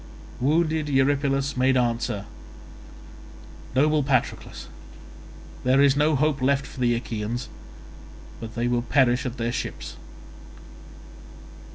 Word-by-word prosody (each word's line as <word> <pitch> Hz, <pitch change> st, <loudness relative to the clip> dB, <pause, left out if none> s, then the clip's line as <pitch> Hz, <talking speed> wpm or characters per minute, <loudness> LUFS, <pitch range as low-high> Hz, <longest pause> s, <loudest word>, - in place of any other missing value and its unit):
Wounded 155 Hz, +2 st, +1 dB
Eurypylus 135 Hz, 0 st, +1 dB
made 130 Hz, +1 st, +3 dB
answer, 115 Hz, -4 st, -1 dB, 1.5 s
"Noble 150 Hz, +3 st, +3 dB
Patroclus, 135 Hz, -1 st, -1 dB, 1.0 s
there 130 Hz, +2 st, +3 dB
is 140 Hz, -1 st, +5 dB
no 150 Hz, +1 st, +3 dB
hope 145 Hz, 0 st, +1 dB
left 140 Hz, +1 st, +2 dB
for -, -, -11 dB
the 120 Hz, -1 st, +2 dB
Achaeans 115 Hz, +1 st, -4 dB, 0.9 s
but 110 Hz, -1 st, -8 dB
they 120 Hz, 0 st, 0 dB
will 120 Hz, 0 st, +1 dB
perish 130 Hz, +1 st, +2 dB
at 125 Hz, -, -6 dB
their 115 Hz, 0 st, -1 dB
ships. 120 Hz, -, -5 dB
130 Hz, 105 wpm, -25 LUFS, 120-140 Hz, 1.5 s, is